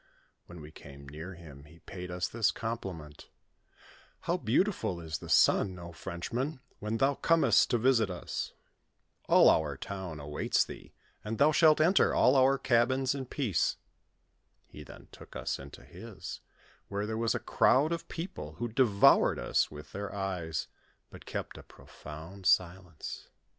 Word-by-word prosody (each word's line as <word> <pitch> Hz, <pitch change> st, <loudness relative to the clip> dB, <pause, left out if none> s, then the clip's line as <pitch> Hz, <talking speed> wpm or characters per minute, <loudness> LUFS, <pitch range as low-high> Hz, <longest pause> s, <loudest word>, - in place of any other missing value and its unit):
When 85 Hz, -2 st, -11 dB
we 75 Hz, +1 st, -11 dB
came 70 Hz, -2 st, -13 dB
near 80 Hz, +6 st, -8 dB
him, 75 Hz, -4 st, -13 dB
he 80 Hz, +3 st, -17 dB
paid 90 Hz, +1 st, -9 dB
us 90 Hz, +1 st, -2 dB
this 115 Hz, -2 st, +1 dB
compliment: 95 Hz, -10 st, -6 dB, 0.4 s
" -, -, -25 dB
How 170 Hz, -, 0 dB
beautiful 135 Hz, -, 0 dB
is 80 Hz, -2 st, -5 dB
the -, -, -10 dB
sun, 95 Hz, -2 st, +4 dB
O 85 Hz, -1 st, -9 dB
Frenchman, 120 Hz, -, -4 dB, 0.2 s
when 105 Hz, +2 st, -2 dB
thou 135 Hz, +4 st, +3 dB
comest 135 Hz, -8 st, +3 dB
to 120 Hz, -, +2 dB
visit 115 Hz, -3 st, +3 dB
us! 90 Hz, -, -5 dB, 0.8 s
All -, -, +7 dB
our 75 Hz, -3 st, +3 dB
town 95 Hz, -1 st, -6 dB
awaits 75 Hz, 0 st, 0 dB
thee, -, -, -11 dB, 0.3 s
and 110 Hz, +1 st, -4 dB
thou 145 Hz, +2 st, +5 dB
shalt 155 Hz, 0 st, +5 dB
enter 175 Hz, +5 st, +4 dB
all -, -, +4 dB
our 135 Hz, +1 st, +4 dB
cabins 130 Hz, +1 st, +2 dB
in 135 Hz, -2 st, -5 dB
peace." 120 Hz, -, 0 dB, 0.9 s
He 75 Hz, -, -12 dB
then -, -, -14 dB
took -, -, -14 dB
us -, -, -3 dB
into 70 Hz, +1 st, -11 dB
his, -, -, -9 dB, 0.5 s
where 100 Hz, +1 st, -3 dB
there 110 Hz, +1 st, -3 dB
was 115 Hz, 0 st, 0 dB
a -, -, -1 dB
crowd 145 Hz, +5 st, +3 dB
of 170 Hz, 0 st, -3 dB
people, 120 Hz, -, -6 dB
who 120 Hz, +8 st, -4 dB
devoured 110 Hz, -4 st, +4 dB
us -, -, +1 dB
with 75 Hz, -1 st, -11 dB
their 100 Hz, +1 st, -5 dB
eyes, 90 Hz, -6 st, -3 dB, 0.4 s
but -, -, -13 dB
kept -, -, -5 dB
a -, -, -10 dB
profound 85 Hz, +5 st, -10 dB
silence. 90 Hz, -3 st, -1 dB
100 Hz, 160 wpm, -30 LUFS, 80-130 Hz, 0.9 s, All